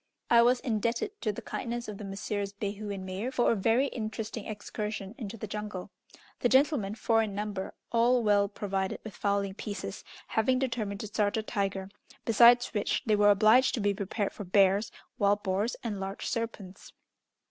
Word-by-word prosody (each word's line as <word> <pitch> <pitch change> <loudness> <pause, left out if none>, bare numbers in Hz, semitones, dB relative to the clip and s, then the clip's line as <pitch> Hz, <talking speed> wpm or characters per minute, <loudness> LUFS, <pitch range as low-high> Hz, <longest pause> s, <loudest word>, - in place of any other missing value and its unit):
I 235 0 +8
was 245 +1 +4
indebted 235 - -1
to 215 - 0
the 205 - -8
kindness 240 0 -4
of 210 -2 -7
the - - -6
Messrs. 200 0 -3
Behu 205 +1 -4
and 190 -2 -5
Meyer 190 +6 -3
for 245 -2 +2
a - - +2
very 225 +6 +3
interesting 220 -3 -5
excursion 210 -1 -5
into 225 -2 -7
the 215 - -5
jungle. 210 -2 -6 0.5
The 245 - +2
gentlemen, 260 -6 +3
four 225 0 +2
in 210 -3 -3
number, 205 -2 -4 0.2
all 240 +1 +3
well 205 -1 +4
provided 195 -1 -3
with 215 -5 -8
fowling 200 +1 0
pieces, 200 -1 -6 0.3
having 240 +4 +2
determined 230 -6 -2
to 215 - -5
start 205 0 0
a 220 - -1
tiger, 195 -3 -2 0.4
besides 240 +2 +6
which 205 -2 0
they 215 -2 +3
were 205 0 +5
obliged 215 +6 +5
to - - -3
be 205 -1 +2
prepared 200 +1 -2
for 205 - -7
bears, 195 +2 +3 0.3
wild 205 0 +2
boars, 200 +4 0
and 215 -4 -3
large 195 +1 -5
serpents. 225 -5 -5
210 Hz, 180 wpm, -29 LUFS, 200-230 Hz, 0.5 s, I